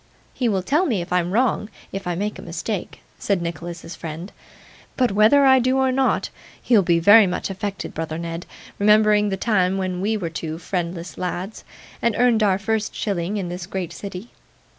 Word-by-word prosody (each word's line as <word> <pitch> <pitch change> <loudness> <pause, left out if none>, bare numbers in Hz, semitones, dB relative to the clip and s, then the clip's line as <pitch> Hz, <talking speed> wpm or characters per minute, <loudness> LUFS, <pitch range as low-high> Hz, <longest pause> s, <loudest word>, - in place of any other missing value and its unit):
'He 245 -3 0
will 190 -3 0
tell 310 - +2
me 195 -9 -1
I'm 180 -1 +1
wrong, 220 0 +1 0.2
if 195 -1 -5
I 175 - -1
make 205 +4 -3
a - - -7
mistake,' - - -5 0.2
said 200 -3 0
Nicholas's 170 0 -6
friend. 165 +4 -7 0.7
'But 250 -4 +2
whether 215 +8 +5
I 265 -1 +6
do 255 +2 +1
or 265 -1 +2
not, 265 +1 +1 0.3
you'll 225 -5 +5
be 175 -2 +2
very 205 +5 +7
much 180 +2 -3
affected, 200 0 -5
brother 160 0 -4
Ned, 170 0 -5 0.3
remembering 210 0 +4
the 195 - -2
time 190 -3 +1
when 185 -1 -2
we 215 +3 0
were 170 -5 -4
two 160 0 -5
friendless 175 0 -4
lads, 185 +3 -4 0.4
and 235 -2 +1
earned 240 -3 +3
our 195 -3 +3
first 215 +2 -2
shilling 195 0 -2
in 185 -3 -3
this 175 0 -6
great 185 -3 -4
city. 200 +3 -8
195 Hz, 185 wpm, -22 LUFS, 175-215 Hz, 0.7 s, very